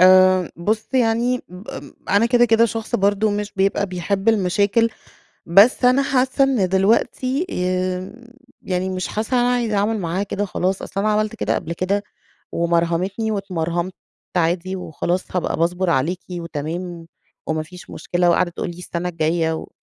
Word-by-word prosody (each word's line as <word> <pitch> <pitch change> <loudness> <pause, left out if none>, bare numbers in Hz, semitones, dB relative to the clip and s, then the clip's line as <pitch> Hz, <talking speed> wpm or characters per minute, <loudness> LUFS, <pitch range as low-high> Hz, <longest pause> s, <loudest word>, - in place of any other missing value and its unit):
آمم 185 -1 +6
بُص 215 - -2
يعني 240 0 +2
ب 180 +4 -12
ام - - -8 0.2
أنا 205 +4 +4
كده، 240 0 +4
كده 230 0 +4
شخص 225 -1 -3
برضه 205 +2 +2
مش 205 0 -3
بيبقى 195 +1 +1
بيحب 195 +3 -2
المشاكل، 205 +2 +2 0.6
بس 200 +9 +5
أنا 255 +2 +5
حاسّة 265 0 +2
إن 250 -9 +1
دلوقتي 235 - +1
آمم 185 0 -1 0.5
يعني 185 0 -2
مش 185 -1 -3
حاسّة 220 +4 -2
إن - - +4
أنا 245 - +2
عايزة 230 -4 0
أعمل 210 +2 +1
معاها 175 +2 -1
كده 205 0 -2
خلاص. 190 0 -1
أصل 195 - -4
أنا 215 +1 +1
عملت 215 0 0
كده 105 +2 0
قبل 165 - -3
كده 190 +4 -1 0.5
ومرهمتني، 170 +6 0
واتمرهمت 180 -3 -2 0.4
عادي 175 +2 0
وخلاص 180 +1 -2
هابقى 180 - 0
باصبر 175 +3 +1
عليكِ 170 +4 +1
وتمام، 170 +1 -5 0.4
وما 155 0 -1
فيش 180 +3 -13
مشكلة، 175 0 0
وقاعدة 175 +1 +2
تقول 170 - -4
لي 170 - -8
السنة 180 0 -4
الجاية 160 0 0
و 160 - -6
185 Hz, 160 wpm, -21 LUFS, 175-215 Hz, 0.6 s, آمم